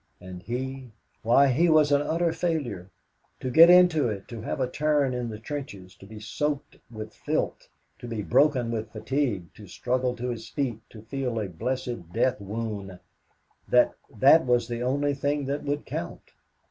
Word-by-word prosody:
And 90 -1 -9
he? 130 +3 -5 0.3
Why, 135 +5 +5
he 165 +7 +3
was 155 -2 +4
an 145 0 +4
utter 165 +2 0
failure. 145 - -2 0.5
To 130 - -3
get 165 +6 +8
into 175 -7 +6
it, 100 -2 -6
to 115 -2 -7
have 115 - -4
a 130 - +1
turn 145 -1 +1
in 125 -1 -3
the 110 - -6
trenches, 105 -7 -7
to 95 - -14
be 110 0 -10
soaked 145 +7 -3
with 110 -1 -8
filth, - - -3 0.3
to 120 - -8
be 115 -3 -4
broken 130 -2 +2
with 110 -1 -4
fatigue, 110 - -2
to 105 - -13
struggle 125 +5 -1
to 125 +1 -4
his 115 -2 -6
feet, 130 -6 -2
to 110 -2 -13
feel 125 -1 -3
a 105 - -2
blessed 120 -1 -4
death 125 +4 +1
wound 100 -2 -5 0.7
that, - - +4 0.2
that 140 +2 +6
was 120 -1 +2
the 120 -1 -4
only 140 +3 0
thing 140 +1 -1
that 140 +2 -2
would 145 +1 -2
count. - - -6
125 Hz, 175 wpm, -26 LUFS, 110-145 Hz, 0.7 s, get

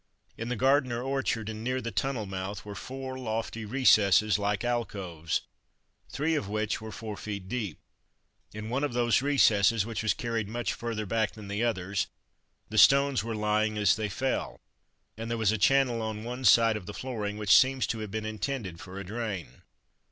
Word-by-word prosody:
In 115 +1 -5
the 125 - -1
garden 135 +2 +3
or 120 +1 -2
orchard, 130 -5 -1
and 110 0 -5
near 130 +2 0
the 115 -2 -4
tunnel 125 +1 -1
mouth, 95 +1 -5
were 105 - -6
four 130 +5 -6
lofty 110 -2 -3
recesses, 110 -4 +4
like 100 +1 -1
alcoves, 100 -9 -2 0.7
three 150 +3 0
of 145 -11 -1
which 110 +1 -1
were 110 0 -7
four 110 -2 -6
feet 100 -2 -6
deep. 110 -7 -3 0.7
In 110 +1 -6
one 135 +3 0
of 145 - -1
those 120 0 +3
recesses, 115 -6 +4
which 115 -1 -3
was 110 -3 +1
carried 115 -3 -2
much 120 +1 -2
further 115 -2 -4
back 110 +1 0
than 105 -2 -10
the 105 +3 -1
others, 100 -4 -1 0.6
the 110 - +2
stones 140 +3 +6
were 115 0 -3
lying 105 0 +1
as 105 -2 +4
they 110 -1 -2
fell, 130 +6 -2 0.6
and 115 +1 -5
there 115 - -1
was 110 -2 +3
a 110 - 0
channel 130 0 +3
on 110 -1 -4
one 125 +2 -5
side 115 -2 +6
of 95 - -10
the 105 - -6
flooring 105 -5 -4
which 105 -2 +5
seemed 130 -4 +4
to 110 - -2
have 110 -1 -5
been 110 +2 -4
intended 110 -5 -4
for 95 +2 -8
a - - -5
drain. 100 - -5
110 Hz, 190 wpm, -29 LUFS, 105-120 Hz, 0.7 s, stones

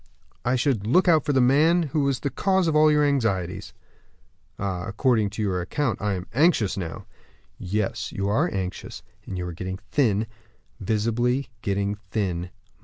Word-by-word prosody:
"I 120 +2 +1
should 120 -5 0
look 180 +11 +4
out 160 -3 +5
for - - +1
the 135 - +3
man 155 +7 +4
who 155 - +2
was 135 -2 0
the 140 - -2
cause 190 -2 +1
of 160 - +1
all 155 0 +6
your 150 0 +3
anxieties." 105 -11 -1 0.9
"Ah! 95 -2 -3
according 110 0 +1
to 110 +2 -4
your 95 -3 0
account, 120 +6 -2
I 105 0 0
am 90 0 -5
anxious 130 - +3
now." 85 -5 -6 0.5
"Yes, 100 +2 -2
you 100 0 -2
are 145 - +2
anxious; 95 -1 -5 0.2
and 95 - -5
you 90 - -3
are 90 - -5
getting 95 +2 -5
thin, 110 -7 +2 0.5
visibly 115 +6 0
getting 100 0 -1
thin. 90 -5 -2
110 Hz, 170 wpm, -25 LUFS, 95-140 Hz, 0.9 s, all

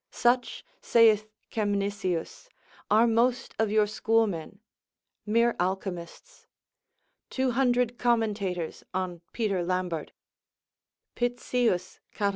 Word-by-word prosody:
Such, 240 -1 0 0.2
saith 215 -2 +4 0.2
Kemnisius, 205 - -2 0.4
are 220 +3 +5
most 240 +2 +1
of 220 -1 +2
your 215 0 +3
schoolmen, 210 -5 0 0.7
(mere 230 +2 +3
alchemists) 185 - -4 0.8
200 250 -2 +1
commentators 205 -8 -1
on 180 -2 -3
Peter 200 -6 -1
Lambard; 180 -3 -2 1.0
(Pitsius 245 -6 -1 0.2
catal. 200 -1 +1
215 Hz, 85 wpm, -28 LUFS, 185-240 Hz, 1.0 s, are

